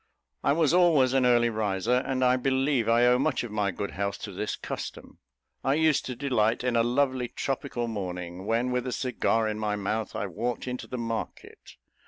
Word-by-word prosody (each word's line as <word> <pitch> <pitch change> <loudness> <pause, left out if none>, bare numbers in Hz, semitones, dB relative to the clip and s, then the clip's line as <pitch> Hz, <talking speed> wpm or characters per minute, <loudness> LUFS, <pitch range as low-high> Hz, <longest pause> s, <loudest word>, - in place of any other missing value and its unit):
I - - +3
was 160 0 +2
always 160 -8 +4
an 130 -2 +3
early 120 -1 +4
riser, 110 +2 0
and 130 -1 -1 0.2
believe 130 -2 +1
I 120 +1 +5
owe 125 0 +4
much 145 -1 0
of 120 - -6
my 105 -2 0
good 100 +2 -4
health 100 0 -3
to 105 - -5
this 100 +2 -3
custom. - - -7 0.4
I 135 - +2
used 155 -2 +2
to 125 - -4
delight 120 -4 +1
in 125 -1 0
a 115 - +4
lovely 130 +1 +1
tropical 120 -2 -3
morning, 90 -3 -5
when, 120 +3 +1
with 125 0 -1
a - - -2
cigar 115 -3 0
in 110 0 -3
my 105 -1 -1
mouth, 105 +2 -3
I - - -2
walked 120 +7 -3
into 125 0 -5
the 125 - -5
market. 115 -1 -6
120 Hz, 195 wpm, -27 LUFS, 105-130 Hz, 0.4 s, I